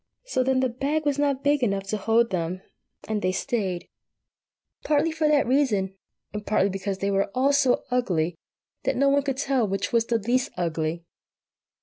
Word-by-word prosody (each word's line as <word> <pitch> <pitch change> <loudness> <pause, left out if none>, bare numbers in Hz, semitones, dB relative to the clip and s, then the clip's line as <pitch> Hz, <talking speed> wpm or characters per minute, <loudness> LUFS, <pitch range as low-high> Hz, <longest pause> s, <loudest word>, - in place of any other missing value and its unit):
So 380 - 0
then 260 0 +2
the 260 - +1
bag 280 +6 -1
was 285 -1 +1
not 280 -2 +1
big 285 0 +2
enough 200 -5 0
to 215 - 0
hold 230 +3 +2
them, 180 +1 -2 0.4
and 215 -1 -1
they 185 - +1
stayed, 190 -4 -2 1.0
partly 305 +2 +2
for 315 -1 0
that 300 -2 +3
reason, 220 -8 +1 0.4
and 210 0 -4
partly 205 -1 +2
because 195 0 -3
they 195 +1 -1
were 195 0 +1
all 270 +3 +3
so 275 -3 +3
ugly 180 -10 0 0.5
that 265 -1 -1
no 280 +1 +4
one 285 +1 +3
could 270 -2 -2
tell 265 -5 +1
which 195 +3 -2
was 230 -1 +3
the 235 - +2
least 245 +4 0
ugly. 165 -1 -2
235 Hz, 185 wpm, -25 LUFS, 195-275 Hz, 1.0 s, no